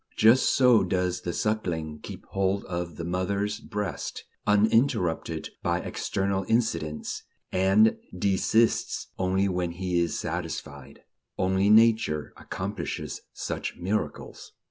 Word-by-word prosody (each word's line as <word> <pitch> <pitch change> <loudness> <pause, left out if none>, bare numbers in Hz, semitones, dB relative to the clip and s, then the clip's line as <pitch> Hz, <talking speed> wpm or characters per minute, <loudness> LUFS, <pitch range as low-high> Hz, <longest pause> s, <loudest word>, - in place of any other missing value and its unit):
Just 115 +4 +5
so 125 -5 +6
does 90 -1 0
the 90 - -3
suckling 85 -7 -2
keep - - -9
hold 95 +1 0
of 85 -3 -4
the 85 - -5
mother's 100 +4 -1
breast, 105 -2 -4 0.2
uninterrupted 105 - +2
by - - 0
external 95 0 -1
incidents, 85 -10 -1 0.3
and 95 +4 +4 0.2
desists 100 +4 +1
only 95 +1 +2
when 90 -2 -1
he 90 0 -1
is 85 -2 0
satisfied. 70 -2 -5 0.3
Only 95 +2 +2
Nature 110 -9 +4
accomplishes - - -5
such - - -4
miracles. 100 +5 -4
95 Hz, 110 wpm, -27 LUFS, 85-105 Hz, 0.3 s, so